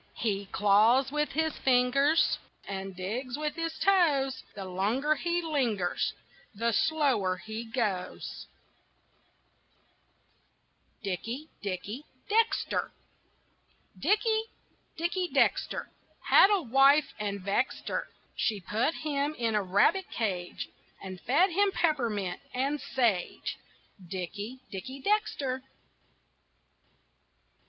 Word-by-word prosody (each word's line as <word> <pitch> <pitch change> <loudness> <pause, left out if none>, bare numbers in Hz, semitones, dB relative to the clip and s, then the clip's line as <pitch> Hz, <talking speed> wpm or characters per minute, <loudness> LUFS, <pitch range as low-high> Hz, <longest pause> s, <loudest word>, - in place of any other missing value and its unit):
He 200 -3 -1
claws 220 +7 +4
with 300 0 -1
his 315 0 +1
fingers 270 +5 +3 0.3
And 195 -1 -5
digs 240 +8 -4
with 300 0 -2
his 330 -1 -3
toes. 290 -9 +3
The 195 -2 -6
longer 210 +11 +1
he 345 +2 -1
lingers 235 - 0 0.4
The 230 +3 +1
slower 250 -10 +2
he 220 +5 -6
goes. 220 -6 -3 2.6
DICKIE, 230 - -4
DICKIE 205 +8 -4 0.2
DEXTER 450 +2 +1 1.1
Dickie, 440 +1 +2 0.5
Dickie 350 +2 0
Dexter - - +1 0.4
Had 390 - +8
a 400 -4 +2
wife 275 +4 +5
and 200 -1 -2
vexed 200 +7 -1
her. - - -2 0.3
She 215 -3 0
put 220 - 0
him 295 -1 -1
in 230 -4 0
a 210 - +2
rabbit 200 - +2
cage 185 -6 -3 0.3
And 185 -2 -7
fed 345 - +3
him 400 +3 +3
peppermint 230 - 0
and 275 +3 0
sage 230 -11 -1 0.4
Dickie, 200 +7 -6
Dickie 260 +8 -7
Dexter. 275 -11 0
255 Hz, 100 wpm, -29 LUFS, 200-305 Hz, 2.6 s, Had